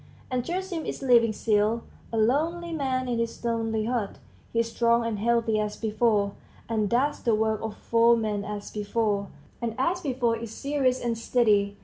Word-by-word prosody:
And 250 -1 0
Gerasim 355 +1 -3
is - - -4
living 235 -3 +5
still, 215 +1 +1 0.3
a 225 - -2
lonely 320 +10 +1
man 260 -4 -1
in 240 -2 -1
his 230 +1 -3
lonely 225 -2 0
hut; 230 -4 -2 0.3
he 230 - +2
is 230 0 -4
strong 235 0 +2
and 220 -3 -2
healthy 230 -1 +2
as 210 0 -2
before, 215 -2 +1 0.4
and 215 -3 0
does 270 +5 +1
the 230 -2 +2
work 220 0 0
of 220 -1 -5
four 235 0 +4
men 210 -2 -1
as 205 0 -6
before, 210 -1 -1 0.3
and 230 -2 -2
as 345 +8 0
before 250 -6 0
is 230 0 -6
serious 265 0 0
and 235 -1 -1
steady. 210 -4 +2
230 Hz, 175 wpm, -27 LUFS, 215-250 Hz, 0.4 s, living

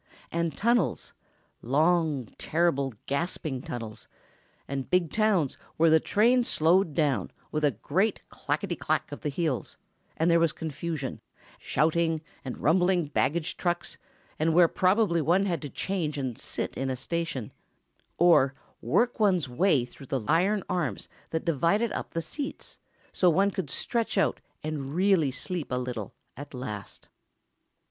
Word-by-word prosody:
And 170 -3 -1
tunnels—long, 160 - 0
terrible, 140 -6 +1
gasping 140 -2 -2
tunnels; 115 -4 -7 0.6
and 135 -1 -4
big 180 -3 +2
towns 210 - +2 0.2
where 165 0 +5
the 160 - +7
train 240 +8 +3
slowed 165 -4 +2
down 150 -4 +1 0.2
with 155 0 -1
a 145 - +5
great 185 - 0
clackety - - -2
clack - - -1
of - - -8
wheels, 150 - -2 0.4
and 165 +2 +3
there 170 - +5
was 165 -1 +2
confusion—shouting, 160 +1 -2 0.2
and 130 - -5
rumbling 175 +2 +2
baggage 155 +4 0
trucks, 175 -1 -2 0.4
and 160 +1 +2
where 175 -1 +7
probably 185 -1 +2
one 175 +6 +3
had 175 -4 -1
to 145 - -5
change 160 -3 -2
and 130 -4 -2
sit - - -4
in 135 0 -2
a 130 - -1
station, 135 -3 -3 0.7
or 150 -6 +5 0.3
work 240 0 +1
one's 185 -8 +3
way 135 0 +2
through 130 +2 -14
the 130 -5 -2
iron 190 +6 +2
arms 160 - -2 0.2
that 160 - -2
divided 170 - +2
up - - -5
the 165 - 0
seats, 285 - -6 0.3
so 180 - +4
one 195 +4 +3
could 190 - -4
stretch 230 -3 -1
out, 195 - +2 0.2
and 150 -2 -4
really 185 -5 +3
sleep 160 +4 -4
a 125 - +1
little, 125 -5 -4 0.2
at 145 +1 -9
last. 105 -6 -7
160 Hz, 140 wpm, -28 LUFS, 140-180 Hz, 0.7 s, the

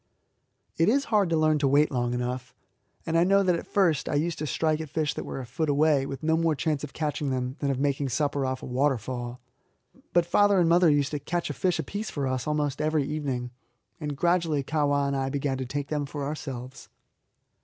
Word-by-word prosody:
It 165 +4 +4
is 275 +4 +2
hard 200 -4 +4
to 165 - +2
learn 155 -1 +3
to 140 - +2
wait 145 +3 +4
long 120 -2 0
enough, 125 +1 -4 0.5
and 165 - -1
I 165 - +5
know 195 +2 +4
that 180 -2 +3
at - - -5
first 175 -8 +2
I - - -1
used 160 +3 0
to 155 - -2
strike 155 +1 0
at 155 - -7
fish 155 -1 -1
that - - -5
were - - -5
a 130 - -6
foot 150 +6 -2
away, 145 -1 +3
with 135 0 -6
no 160 +1 +3
more 165 -1 +2
chance 150 -1 -1
of 145 - -5
catching 150 -2 -2
them 130 0 -2
than 140 - -1
of 135 - 0
making 140 -1 0
supper 140 +2 0
off 130 0 -2
a - - -4
waterfall. 125 -2 -1 0.7
But 175 -1 +3
father 200 +2 +4
and 170 - +4
mother 170 0 +5
used 145 -2 +2
to 150 - -2
catch 170 +1 -2
a - - -4
fish 180 +4 0
apiece 210 +1 -4
for 140 -2 -3
us 130 +1 -2
almost 150 -2 -1
every 155 -1 +1
evening, 135 -4 -3 0.5
and 145 -2 -4
gradually 170 -3 +1
Kahwa 145 -1 +1
and 140 0 -1
I 135 0 -1
began 135 -1 -2
to 130 - -3
take 140 +2 -4
them 150 -2 -1
for 145 0 -5
ourselves. 135 -3 -6
145 Hz, 225 wpm, -27 LUFS, 135-160 Hz, 0.7 s, I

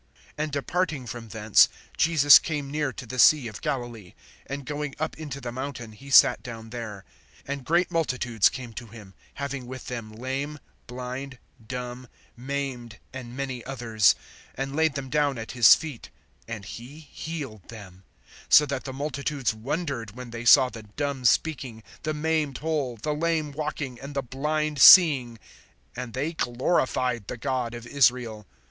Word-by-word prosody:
(29)And 155 0 -1
departing 150 0 -2
from 120 -1 -7
thence, 105 -1 +4 0.3
Jesus 150 -3 +7
came 145 -3 -4
near 150 -2 -1
to 125 - -9
the 130 +3 -6
sea 135 0 +6
of 110 - -9
Galilee; 120 -8 -4 0.3
and 140 0 -5
going 145 0 -4
up 155 +1 -3
into 145 -3 -7
the 125 -3 -6
mountain, 130 -3 -6
he 135 +6 -13
sat 135 - +6
down 115 -2 -9
there. 110 -5 -7 0.4
(30)And 140 -1 -4
great 170 +5 +1
multitudes 125 - +2
came 125 -3 -8
to 120 +1 -8
him, 105 -3 -13 0.2
having 140 -2 -5
with 130 0 -8
them 115 -3 -6
lame, 135 +6 -4 0.3
blind 125 +2 -6 0.3
dumb, 125 +2 -6 0.3
maimed, 125 -3 -5 0.2
and 125 -1 -8
many 130 -3 -4
others, 115 -6 +2 0.4
and 135 +1 -4
laid 160 -2 +2
them 140 -1 -4
down 145 -1 +1
at 110 0 -6
his 120 -3 +8
feet, 150 -7 -8 0.4
and 110 -4 -6
he 130 +10 -10
healed 145 - -7
them; 95 -5 -12 0.5
(31)so 150 - +7
that 140 -2 -3
the 135 - -4
multitudes 140 -2 -2
wondered, 120 -2 -4
when 125 -1 -9
they 115 0 -6
saw 130 +2 +8
the 115 - -9
dumb 135 +5 -4
speaking, 125 -4 +1 0.2
the 155 - -2
maimed 150 -3 0
whole, 150 -6 -2
the 150 +8 -2
lame 155 -1 -1
walking, 145 -4 -4
and 140 +1 -9
the 140 - -1
blind 150 +3 -2
seeing; 135 -10 +8 0.6
and 125 -3 -6
they 145 +6 -2
glorified 125 - 0
the 125 - -5
God 120 0 -2
of 120 0 -9
Israel. 120 -6 +1
130 Hz, 160 wpm, -26 LUFS, 120-145 Hz, 0.6 s, his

